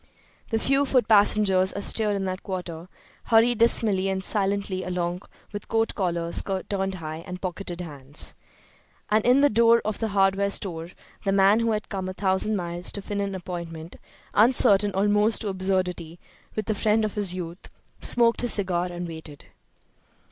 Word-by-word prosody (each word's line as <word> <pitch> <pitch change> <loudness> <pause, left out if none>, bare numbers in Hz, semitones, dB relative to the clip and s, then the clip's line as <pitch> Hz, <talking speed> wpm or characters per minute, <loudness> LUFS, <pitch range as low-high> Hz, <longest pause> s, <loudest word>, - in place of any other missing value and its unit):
The 225 - 0
few 275 +4 +1
foot 255 -2 +2
passengers 200 -3 +4
astir 210 +1 0
in 195 -1 -3
that 185 0 -4
quarter 175 -3 -6 0.4
hurried 230 0 +3
dismally 210 -4 +4
and 190 0 -2
silently 200 -2 -1
along 180 0 -3 0.3
with 205 - -7
coat 225 0 0
collars 170 -3 0 0.3
turned 195 -1 -2
high 160 -1 -7
and 180 0 -7
pocketed 180 -1 -5
hands. 145 -3 -6 0.8
And 215 0 +3
in 250 +3 +4
the 290 - +5
door 230 +1 +5
of 215 -1 -3
the 225 - -1
hardware 195 -1 +1
store 170 -4 -2 0.3
the 195 - 0
man 195 +2 +4
who 230 0 0
had 215 -1 -2
come 190 -2 -4
a 185 - -7
thousand 190 +2 0
miles 175 -1 -2
to 200 - -4
fill 205 0 -3
an 200 -1 -3
appointment, 170 -2 -7 0.4
uncertain 205 -3 +4
almost 210 +2 +2
to 210 - -2
absurdity, 185 -3 -2 0.4
with 215 - -3
the 215 - -1
friend 215 +1 +1
of 210 - -4
his 200 -4 -1
youth, 175 0 -7 0.3
smoked 235 -1 +2
his 245 -2 +4
cigar 180 -3 +1
and 175 0 -6
waited. 160 -3 -10
195 Hz, 165 wpm, -25 LUFS, 180-215 Hz, 0.8 s, the